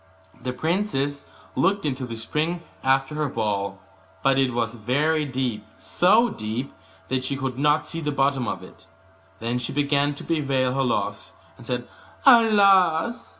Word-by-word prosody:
The 125 - -3
princess 145 -1 -1 0.3
looked 200 -2 +1
into 130 -3 -2
the 115 - -6
spring 155 +9 -2 0.2
after 135 +2 +2
her 150 -1 -1
ball, 100 -4 -2 0.4
but 135 0 +3
it 130 -2 +2
was 115 -1 -1
very 145 +7 0
deep, 125 -6 -2
so 215 +7 +3
deep 110 - -4 0.4
that 130 -1 -1
she 140 - -2
could 130 -1 -4
not 150 +2 +3
see 165 - -6
the 150 -1 -1
bottom 135 -2 +1
of - - -4
it. - - -16 0.5
Then 120 +2 -2
she 125 - -4
began 145 0 +1
to - - -8
bewail 135 -5 0
her 135 0 +1
loss, 125 - -2 0.2
and - - -14
said, 125 -1 -3 0.4
'Alas! 205 - +5
135 Hz, 155 wpm, -24 LUFS, 125-160 Hz, 0.5 s, Alas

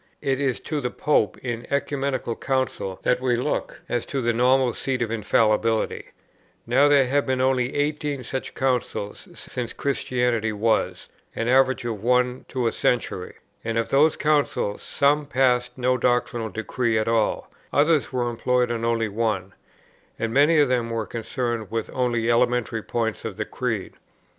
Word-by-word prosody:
It 135 -1 0
is 135 -3 0
to 150 -2 -3
the 125 - -1
Pope 120 -8 +1
in 120 -2 -5
Ecumenical 140 -4 -1
Council 130 -8 -2
that 125 0 +2
we 125 -2 +2
look, 120 - -2
as 120 -1 -1
to 140 - -2
the 120 -2 +1
normal 125 +1 +3
seat 130 +1 -2
of 115 - -4
Infallibility: 110 0 +1 0.6
now 130 +5 +4
there 140 -2 +5
have 140 +3 +1
been 130 -1 0
only 130 -1 +1
eighteen 145 -2 -1
such 130 +2 -5
Councils 125 -6 -2
since 120 -2 -6
Christianity 125 -5 0
was, 110 +2 0 0.3
an 115 - -2
average 130 -1 +3
of 110 -4 -3
one 125 +1 +1
to 130 -2 -2
a 115 - +2
century, 110 -7 -1 0.3
and 115 0 -2
of 115 - 0
these 150 +3 +4
Councils 145 -9 0
some 145 +1 +1
passed 125 -2 +1
no 125 0 +1
doctrinal 120 -2 0
decree 110 +2 -1
at 110 - 0
all, 115 -1 0 0.2
others 150 0 +3
were 125 -2 0
employed 125 +1 +1
on 115 -1 -2
only 115 -1 +1
one, 105 -3 -2 0.6
and 115 0 -2
many 145 +5 +5
of 145 -2 +5
them 125 -2 0
were 115 -1 -2
concerned 115 -1 -3
with 115 -1 -3
only 120 -3 0
elementary 120 -1 +1
points 115 0 -2
of 110 -3 -5
the 110 - -2
Creed. 115 -6 -3
125 Hz, 160 wpm, -24 LUFS, 115-130 Hz, 0.6 s, there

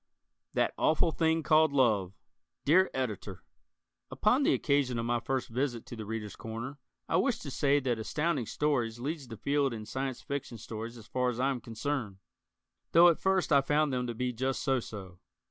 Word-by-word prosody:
That - - +2
Awful 160 +1 +3
Thing 160 0 +1
Called 155 +1 +4
Love 110 -9 +2 0.5
Dear 185 +6 +5
Editor: 105 -8 -4 0.7
Upon - - +2
the - - +4
occasion 140 -4 +1
of 115 - -2
my 120 0 +1
first 135 +1 -2
visit 120 -1 -2
to - - -8
"The 110 -2 -7
Readers' 105 -2 -5
Corner," 115 +6 -6 0.3
I - - +2
wish 270 -4 +2
to 140 - -7
say 140 +2 +3
that 125 -4 -1
Astounding 150 +1 -1
Stories 125 -7 0
leads 145 +1 -4
the 115 -2 -8
field 140 +1 +1
in 110 -1 -7
Science 130 +2 -3
Fiction 140 -4 -4
stories 115 +2 -7
as 110 - -12
far 125 +1 0
as 120 -1 -4
I 135 +2 +2
am 125 -3 -4
concerned, 115 -3 -3 0.8
though 170 +1 +8
at 170 - +1
first 190 -4 +2
I 140 - +6
found 145 +1 +1
them 125 -1 -1
to 120 - -4
be 125 +2 -1
just 130 +3 -2
so 135 -3 +2
so. 95 -6 -9
130 Hz, 190 wpm, -30 LUFS, 115-145 Hz, 0.8 s, though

